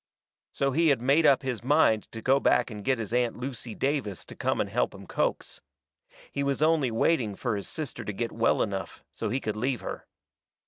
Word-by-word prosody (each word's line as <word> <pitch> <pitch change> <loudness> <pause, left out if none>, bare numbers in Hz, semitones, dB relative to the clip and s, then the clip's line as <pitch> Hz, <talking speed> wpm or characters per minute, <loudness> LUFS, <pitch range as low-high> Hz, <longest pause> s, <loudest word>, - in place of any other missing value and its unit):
So 140 0 0
he 165 +5 +3
had 140 -5 +4
made 140 +6 +4
up 140 +1 +4
his 125 -4 -3
mind 130 -6 +3
to 115 -1 -8
go 135 +2 +4
back 130 - +2
and 105 -1 -7
get 130 +2 +2
his 115 0 -5
Aunt 120 -1 +1
Lucy 125 -2 -5
Davis 135 -9 -2
to - - -10
come - - -1
and - - +1
help - - -1
him - - -11
coax. - - -2 0.7
He 140 - -2
was 140 +1 0
only 155 -5 +3
waiting 115 -2 +1
fur 120 -1 -2
his 100 - -4
sister 155 -6 -5
to - - -3
get 115 +4 -3
well 115 - +2
enough 95 -2 -5
so - - -3
he 130 - 0
could 110 -4 -3
leave 125 +2 -1
her. - - -6
125 Hz, 215 wpm, -28 LUFS, 110-140 Hz, 0.7 s, had